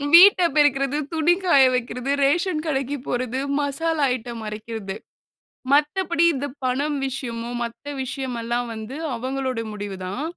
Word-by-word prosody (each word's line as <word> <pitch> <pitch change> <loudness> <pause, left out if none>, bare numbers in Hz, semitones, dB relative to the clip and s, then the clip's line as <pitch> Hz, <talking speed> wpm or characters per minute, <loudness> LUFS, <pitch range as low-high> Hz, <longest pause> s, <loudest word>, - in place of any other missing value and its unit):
வீட்ட 370 +2 +9
பெருக்கறது, 280 -1 +3 0.2
துணி 320 +2 +4
காய 280 -7 +6
வைக்கிறது, 250 +2 -2
ரேஷன் 315 +2 +1
கடைக்கு 275 -1 -1
போறது, 255 +1 -1 0.2
மசாலா 295 +2 0
ஐட்டம் 235 -2 -7
அரைக்கறது. 215 -2 -6 0.8
மத்தபடி 330 +3 +2
இந்த 270 +1 -2 0.2
பணம் 280 +4 0
விஷயமோ 240 -3 -5
மத்த 235 +5 -6
விஷயமல்லாம் 245 -2 -3
வந்து 220 +4 -7 0.2
அவங்களோட 260 0 -2
முடிவு 205 -2 -5
தான். 200 +10 -4
265 Hz, 120 wpm, -23 LUFS, 235-295 Hz, 0.8 s, வீட்ட